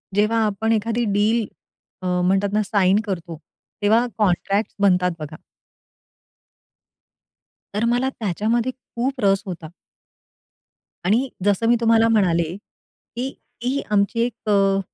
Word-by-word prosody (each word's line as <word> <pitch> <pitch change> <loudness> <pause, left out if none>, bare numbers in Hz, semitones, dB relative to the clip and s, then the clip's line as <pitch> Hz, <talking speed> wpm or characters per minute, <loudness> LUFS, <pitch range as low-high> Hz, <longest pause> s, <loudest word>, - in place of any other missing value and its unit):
जेव्हा 215 +2 +2
आपण 215 +2 -1
एखादी 230 +2 0
डील 215 +3 +2 0.6
अ, - - -7 0.2
म्हणतात 195 +2 +2
ना, 215 - +3
साइन 200 0 +2
करतो, 170 -5 -5 0.4
तेव्हा 220 +4 +4
कॉन्ट्रॅक्ट्स 200 +1 0
बनतात 180 -2 +3
बघा. 155 0 -7 2.4
तर 210 +3 0
मला 245 +3 +1
त्याच्यामध्ये 225 +5 0
खूप 255 +1 -5
रस 195 0 +3
होता. 170 -4 -7 1.4
आणि 235 +8 +2 0.2
जसं 205 +2 +2
मी 240 - +5
तुम्हाला 225 0 +4
म्हणाले, 170 -6 +2 0.6
की 250 +2 -2 0.4
ही 265 +3 0
आमची 200 +2 +1
एक 240 -3 -6
अ, 195 -1 +3
210 Hz, 115 wpm, -22 LUFS, 195-230 Hz, 2.4 s, मी